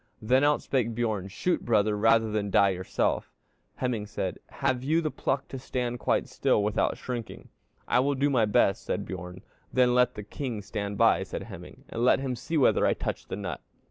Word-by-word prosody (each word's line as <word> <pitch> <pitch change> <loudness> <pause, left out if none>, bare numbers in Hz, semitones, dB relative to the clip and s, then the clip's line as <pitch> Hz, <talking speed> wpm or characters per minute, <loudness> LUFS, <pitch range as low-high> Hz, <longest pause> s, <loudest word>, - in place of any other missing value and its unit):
Then 130 +5 +3
out 145 0 +3
spake 120 -4 0
Bjorn 110 -5 -1
'Shoot, 175 - -1
brother, 105 -2 +2
rather 115 +1 +3
than 105 -1 -1
die 100 0 +5
yourself.' 95 -1 -1 0.5
Hemingr 120 -5 -1
said, 95 -3 -4
'Have 125 -1 -1
you 155 +4 +2
the 155 -2 -1
pluck 135 0 -2
to 135 - -6
stand 125 -1 -3
quite - - +1
still 105 - +1
without 105 0 0
shrinking?' 120 -3 -6 0.4
'I - - +3
will 140 +2 +2
do 140 +2 +1
my 120 -5 +3
best,' 100 -2 +2
said - - -2
Bjorn. 90 0 -7 0.3
'Then 125 -1 +3
let 125 0 +3
the 105 - -6
king 115 0 -5
stand 100 0 -4
by,' - - +4
said - - -5
Hemingr, - - -11
'and 115 - -3
let 125 - +5
him 135 -2 -2
see 140 +7 -3
whether 140 - +4
I - - +3
touch - - -4
the - - -4
nut.' - - -5
115 Hz, 200 wpm, -28 LUFS, 105-130 Hz, 0.5 s, die